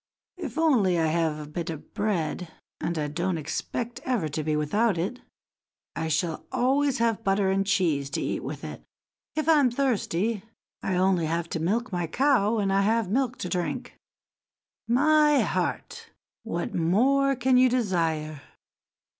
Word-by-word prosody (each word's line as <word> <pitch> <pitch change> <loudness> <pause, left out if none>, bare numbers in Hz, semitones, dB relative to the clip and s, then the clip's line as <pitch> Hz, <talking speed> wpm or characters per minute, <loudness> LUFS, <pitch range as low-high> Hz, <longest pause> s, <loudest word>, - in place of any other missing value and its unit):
"If 355 - -6
only 240 - +3
I 165 - +2
have 160 -1 +1
a 150 -1 -7
bit 170 +2 -4
of 160 -3 -8
bread, 180 -4 -1 0.3
and 170 - -2
I 150 -1 -1
don't 175 +4 -1
expect 235 +9 -4
ever 240 -11 0
to 150 +2 -3
be 155 0 0
without 190 +7 +1
it, 195 +9 -3 0.7
I 160 - -2
shall 160 +1 -1
always 265 +2 +2
have 230 -2 0
butter 195 -1 +2
and 195 0 0
cheese 165 -9 +1
to - - -2
eat - - -2
with - - -6
it. - - -7 0.5
If 310 0 -1
I 320 -2 +6
am 265 -3 +4
thirsty, 230 -5 0 0.4
I 190 - -1
only 180 -3 +2
have 165 +1 -2
to 165 - -3
milk 210 +9 -1
my 175 -2 -1
cow 230 - +2
and 195 -2 +1
I 195 - +3
have 220 -1 +1
milk 255 +1 0
to - - -2
drink. 175 -1 -3 0.9
My 295 +4 +4
heart! 460 -1 -3 0.3
what 175 -7 -4
more 265 +11 +3
can 255 +1 +3
you 255 0 +6
desire?" 165 - -1
195 Hz, 165 wpm, -26 LUFS, 165-250 Hz, 0.9 s, I